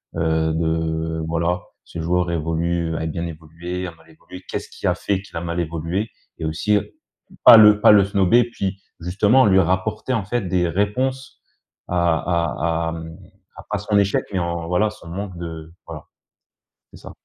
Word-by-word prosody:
heu, 80 -1 +1
de 80 0 -1
voilà. 85 +2 0 0.2
Ce 85 - -9
joueur 90 +1 0
évolue, 85 +1 -1
a 80 - -3
bien 85 +2 -3
évolué, 85 +3 -6
a 85 - -5
mal 80 0 -22
évolué. 90 +3 -13
Qu'est - - -3
ce - - -13
qui - - -5
a - - +2
fait 95 -2 -1
qu'il 100 - -16
a - - -3
mal 85 0 -3
évolué? 85 +6 -2 0.3
Et 80 - -3
aussi 100 +7 +1 0.6
pas - - +10
le 105 -1 +7
pas - - +7
le 105 -2 +7
snober 100 +4 +3
puis 100 -4 -5 0.2
justement 105 +8 +3
lui 95 -1 +5
rapporter 95 +7 -1
en 110 -6 0
fait 120 +2 -1
des 90 -2 0
réponses 125 +9 -2 0.5
à 85 -2 +2
à 85 -1 -1
à, - - -6
hem, 80 0 -8 0.4
à - - -10
pas - - 0
son 105 -1 +1
échec, 100 -1 +1
mais 95 - -2
en 85 -1 -3
voilà, 95 +5 +2
heu, - - -6
son 95 -5 -14
manque 95 +1 -6
de 80 -1 -7
voilà. 80 -3 -8 0.9
C'est - - -13
ça. - - -10
85 Hz, 190 wpm, -21 LUFS, 80-100 Hz, 0.9 s, pas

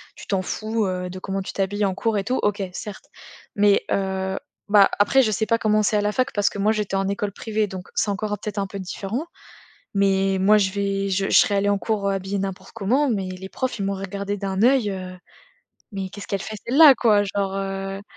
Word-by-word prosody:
Tu - - -12
t'en 195 -2 0
fous, 215 +3 -2
heu, 180 -1 -3
de 185 +1 -7
comment 195 +1 -3
tu - - -6
t'habilles 205 +1 -1
en 190 -1 +1
cours 220 +2 -1
et 195 - 0
tout. 255 +5 -1
OK, 205 -1 0
certes. 200 +2 -8 0.5
Mais, 205 -1 +4
heu, 190 0 -1 0.3
bah, 205 -1 +6
après 265 +6 +4
je 215 - +1
sais 220 +2 0
pas 230 +2 +2
comment 215 -1 +2
c'est 210 +1 +2
à - - +2
la 210 0 0
fac 255 +1 0
parce 205 0 +2
que - - -9
moi 210 +2 +2
j'étais 210 -3 -2
en 195 0 0
école 200 0 -2
privée 215 -1 -1
donc, 185 -1 -8
c'est 210 - +1
encore 205 +1 -2
un 210 - -1
peut-être 210 +1 -6
un 195 -1 -1
peu 200 0 -7
différent. 200 - -4 0.7
Mais 195 -1 +2
moi 210 +2 +5
je 190 -2 +1
vais 200 -1 -1
je 195 +1 0
je - - -3
serais 205 - +4
allée 200 +1 +2
en 200 -1 +2
cours, 205 -2 -1
heu, - - +1
habillée 195 +1 -2
n'importe 195 -1 -5
comment 245 +7 +1
mais 195 -5 -1
les 185 +1 -7
profs 255 0 -3
ils 195 - -2
m'auraient 195 0 -2
regardée 200 +1 -4
d'un 195 0 -2
œil, 250 -5 +4
heu: 185 -1 -6 0.8
«Mais 195 -1 -4
qu'est-ce 205 0 -9
qu'elle 195 -1 -2
fait 215 - -6
celle-là?» 280 +2 +8
quoi 210 -4 +4
genre, 195 -1 -2
heu. 195 0 -4
200 Hz, 240 wpm, -23 LUFS, 195-210 Hz, 0.8 s, celle-là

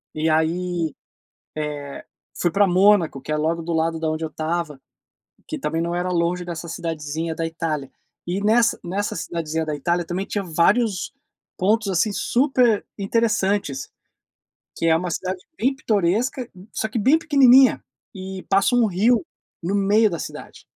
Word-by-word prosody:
E 155 +1 0
aí, 165 +1 0
eh, - - -26 1.5
fui 175 - +1
pra 200 +5 +3
Mônaco, 185 -5 +3
que 155 - -5
é - - +1
logo 165 +2 -1
do 170 +1 -4
lado 165 0 0
da 160 -1 0
onde 155 +1 -3
eu - - -2
estava, 155 -2 -3 0.7
que 310 - -5
também 165 -10 -1
não 170 +1 -2
era 180 +1 -1
longe 175 0 0
dessa 170 -1 -6
cidadezinha 160 0 -4
da 165 - -2
Itália. 160 -4 -3 0.3
E 180 +3 -2
nessa 230 +2 +3
nessa 195 +4 -2
cidadezinha 160 -1 -3
da 155 -1 -2
Itália, 170 +4 -1
também 180 +3 -3
tinha 205 0 -3
vários 185 +6 +1 0.4
pontos, 210 +2 +1
assim, 190 +3 +1
super 245 -2 +2
interessantes, 200 - 0 0.9
que 165 - -1
é 160 - +5
uma 175 +1 -2
cidade 185 +2 -3 0.2
bem 260 +4 +1
pitoresca, 220 +2 0
m 185 +2 -14
só 220 - -1
que 225 - -2
bem 265 +9 +4
pequenininha, 270 -4 +5 0.3
e 190 0 -7
passa 195 +5 +3
um 240 -2 +4
rio 210 +2 +2 0.4
no 185 +4 -1
meio 205 +2 +4
da 170 -3 -4
cidade. - - -8
180 Hz, 160 wpm, -22 LUFS, 165-210 Hz, 1.5 s, é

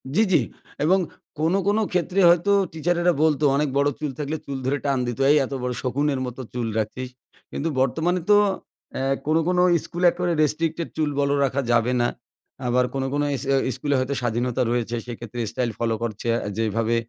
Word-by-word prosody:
জ্বি, 220 - +5
জ্বি। 175 - +5 0.4
এবং 185 +4 +4 0.4
কোনো, 165 +5 +2
কোনো 210 +2 +3
ক্ষেত্রে 180 +1 0
হয়তো 175 +3 +3 0.2
টিচারেরা 175 +2 +1
বলতো 155 -2 +2
অনেক 150 +1 +1
বড়ো 140 +1 +3
চুল 150 -2 -2
থাকলে 150 +2 -2
চুল 140 -1 -4
ধরে 135 +2 +1
টান 140 -1 +1
দিত। 120 +1 -4
এই 150 - +6
এত 135 - -7
বড়ো 125 0 -1
শকুনের 140 +2 0
মতো 125 +1 -6
চুল 120 -2 -2
রাখছিস। 125 +4 -4 0.4
কিন্তু 165 - -2
বর্তমানে 165 +7 +1
তো 205 - +8 0.6
এহ 135 +1 +1
কোনো, 155 +1 +3
কোনো 180 0 +2 0.2
স্কুলে 175 +1 -2
একেবারে 175 0 -1
restricted, 165 +2 -1
চুল 155 -1 +1
বড় 140 0 +2
রাখা 135 +1 -1
যাবে 120 +1 +2
না। 120 - +3 0.6
আবার 125 +1 +3
কোনো, 135 -1 -1
কোনো 145 0 +1
ইস 130 - -5 0.3
স্কুলে 145 +2 -1
হয়তো 130 +2 -1
স্বাধীনতা 120 +1 -1
রয়েছে। 120 -1 -1
সেক্ষেত্রে 120 0 -7
স্টাইল 125 -2 -1
ফলো 115 -1 0
করছে 110 0 -4
আ - - -1 0.2
যেভাবে 115 +1 0
140 Hz, 185 wpm, -23 LUFS, 125-160 Hz, 0.6 s, তো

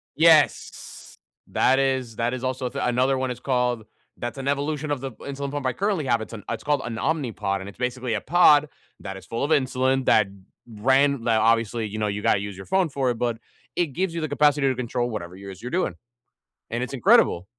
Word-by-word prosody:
Yes. 160 -2 +2 0.3
That 130 +1 +3
is, 130 -4 0
that 120 +2 -1
is 130 0 -5
also 130 -1 -2
th - - -4
another 130 +2 +2
one, 130 - -1
it's 125 - -7
called, 125 -3 0 0.3
that's 120 +3 -5
an 135 - -5
evolution 145 +2 -1
of 140 - -1
the 135 - -4
insulin 140 +3 -6
pump 145 -2 -4
I 130 - +1
currently 195 -4 -1
have. 120 -3 +1
It's 110 - -8
an 105 - -8
it's 110 -1 -4
called 145 -1 +1
an 115 - -4
Omnipod 115 -8 -1
and 95 - -7
it's 100 - -14
basically 125 -1 -2
a 110 - -1
pod 150 -4 +5 0.3
that 95 -1 -6
is - - -12
full 115 - -3
of 145 - -1
insulin 130 -2 +1
that 110 -2 +4 0.4
ran 130 +4 +2
that 110 -2 +3
obviously, 115 0 +2
you 110 +1 -6
know, 105 - 0
you 105 0 -3
gotta - - +3
use 100 0 -6
your 95 - -9
phone 190 -3 +1
for 135 -3 0
it, 115 - -4
but 120 -2 0 0.4
it 175 - +1
gives 170 +4 -2
you 165 - -2
the 155 - -2
capacity 145 -1 +3
to 130 - +1
control 120 0 -2
whatever 90 -5 -6
it 95 - -12
is 95 -1 -9
you're 125 - -5
doing. 185 +5 -1 0.8
And 120 +2 -2
it's 125 +2 -4
incredible. 95 -7 +4
125 Hz, 225 wpm, -24 LUFS, 115-140 Hz, 0.8 s, pod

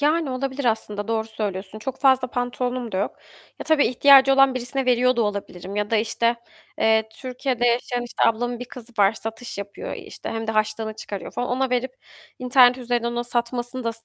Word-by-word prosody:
Yani, 300 0 +2
olabilir 265 +1 -3
aslında, 215 -3 -1
doğru 220 -1 0
söylüyorsun. 205 -2 -5
Çok 260 +4 -5
fazla 260 -2 +4
pantolonum 245 -1 -3
da - - -1
yok. 200 - -2 0.4
Ya, - - -6
tabii 315 -2 +3
ihtiyacı 270 +2 +6
olan 270 -1 +5
birisine 255 +2 -2
veriyor 250 0 +3
da 235 - +3
olabilirim 200 -2 -4
ya 210 0 -1
da 225 - +3
işte, 230 +2 +1 0.4
eee, 220 0 +3
Türkiye'de 250 +1 -2
yaşayan, 245 +1 0
işte, 240 - -4
ablamın 240 +2 0
bir 245 - -5
kızı 245 -1 -12
var, 200 0 +5
satış 225 +1 -7
yapıyor 200 - -6
işte. - - -9
Hem 225 0 -4
de 220 - -1
harçlığını 215 0 -1
çıkarıyor 205 -3 -7
falan. 245 - -3
Ona 260 +1 0
verip 250 +1 -1 0.4
internet 250 0 +5
üzerinden 240 -1 -1
onun 240 0 -2
satmasını 240 +1 -3
da 230 - +1
240 Hz, 190 wpm, -23 LUFS, 220-255 Hz, 0.4 s, ihtiyacı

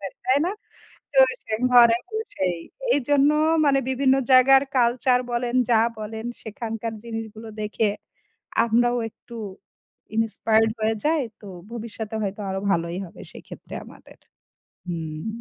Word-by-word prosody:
পারি। 195 -1 -6
তাই 260 +2 +4
না? 370 - -1 0.6
তো 275 - +1 0.3
সেই 215 - -2
ঘরে 235 -2 +7
বসেই। 435 - -2 0.4
এইজন্য 285 +1 +3 0.4
মানে 275 -1 +4
বিভিন্ন 265 0 +3 0.2
জায়গার 265 +1 +7 0.2
কালচার 245 +1 +3
বলেন, 240 0 -1 0.2
যা 230 - +5 0.2
বলেন 220 +1 -6 0.2
সেখানকার 225 +1 -5
জিনিসগুলো 225 -1 -7
দেখে 215 +1 0 0.8
আমরাও 240 +2 +2
একটু 235 - -15 0.8
ইনিন্সপায়ারড 225 0 +2
হয়ে 220 +1 +1
যাই। 310 0 +2 0.2
তো 210 - -12 0.3
ভবিষ্যতে 225 -2 -6
হয়তো 200 +1 -3
আরো 190 0 -2
ভালোই 170 0 0
হবে 170 - -14
সেক্ষেত্রে - - -11
আমাদের। - - -16 0.7
হুম। 160 -1 -5
225 Hz, 125 wpm, -24 LUFS, 215-250 Hz, 0.8 s, ঘরে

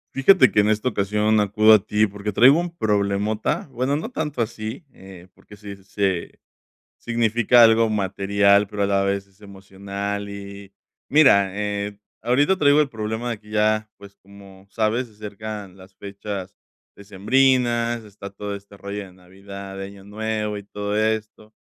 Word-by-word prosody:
Fíjate 185 +8 +5
que, - - +2
en 105 +1 +3
esta 110 +4 +1
ocasión 105 0 +1
acudo 105 +2 +4
a 110 - +7
ti 105 +2 +1
porque 100 +1 -5
traigo 130 - +6
un 175 - -3
problemota, 105 +1 -1
bueno, 130 +3 -1
no 160 +11 -4
tanto 150 - -2
así, 115 +6 -7
eh, 95 -2 -14
porque 105 - -17
si 100 -1 -9
se 95 -2 -3 0.6
significa 120 0 +3
algo 115 0 +5
material, 100 0 +2
pero 105 0 -4
a - - +2
la 100 0 +1
vez 100 0 -2
es 100 +1 -30
emocional 100 +1 -6
y, 100 0 -10 0.4
mira, 100 -10 +4
eh, 105 0 -4 0.2
ahorita 140 - +2
traigo 145 -1 +4
el 150 - +1
problema 110 0 -4
de 115 - -4
que 105 0 -19
ya, 110 0 +1
pues, 100 -1 -15
como 100 -1 -17
sabes, 115 +4 0
se 115 - -21
acercan 105 -2 -8
las 95 0 -16
fechas 100 -1 -7 0.4
decembrinas, 120 +3 +1
está 100 -2 -10
todo 100 0 -6
este 100 0 -15
rollo 100 +1 -6
de 95 - -16
Navidad, 95 +2 -11
de 95 - -5
Año 100 0 -13
Nuevo 105 +1 -3
y 100 - -10
todo 105 0 -4
esto, 110 0 -2
105 Hz, 165 wpm, -22 LUFS, 100-110 Hz, 0.6 s, a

